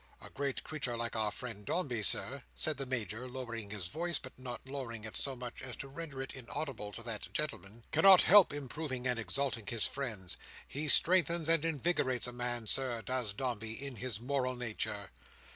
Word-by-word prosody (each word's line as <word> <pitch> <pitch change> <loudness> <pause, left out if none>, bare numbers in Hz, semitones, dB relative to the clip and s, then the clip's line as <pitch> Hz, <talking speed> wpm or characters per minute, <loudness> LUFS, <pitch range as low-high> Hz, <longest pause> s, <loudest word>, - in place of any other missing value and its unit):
A - - -11
great 140 -1 -2
creature 135 -6 -3
like 115 0 -2
our 110 -1 +2
friend 110 -2 -6
Dombey, 125 - 0
Sir," 130 +6 +3
said 155 -3 +1
the 135 -1 -3
Major, 120 -1 -2
lowering 120 -4 -5
his 100 -3 -4
voice, 170 - -1
but 130 - -9
not 130 0 -7
lowering 125 -5 -5
it 110 - -7
so 135 -1 +1
much 125 -1 -7
as 130 -2 -6
to 135 - -7
render 140 -1 -5
it 135 - -8
inaudible 125 -4 -4
to 115 - -7
that 115 -3 -5
gentleman, 115 -7 -3
"cannot 195 -2 +8
help 200 -3 +8
improving 140 -2 -4
and 125 -2 +2
exalting 115 +1 0
his 115 -1 0
friends. 110 -10 -2 0.3
He 150 +3 -3
strengthens 170 0 +5
and 165 -2 +5
invigorates 150 -5 +1
a 125 - -4
man, 120 -1 -2
Sir, 120 0 0
does 125 -1 -1
Dombey, 110 -3 -2
in 135 +1 -6
his 125 -4 -3
moral 130 0 0
nature." 110 -4 -3
125 Hz, 185 wpm, -34 LUFS, 115-140 Hz, 0.3 s, cannot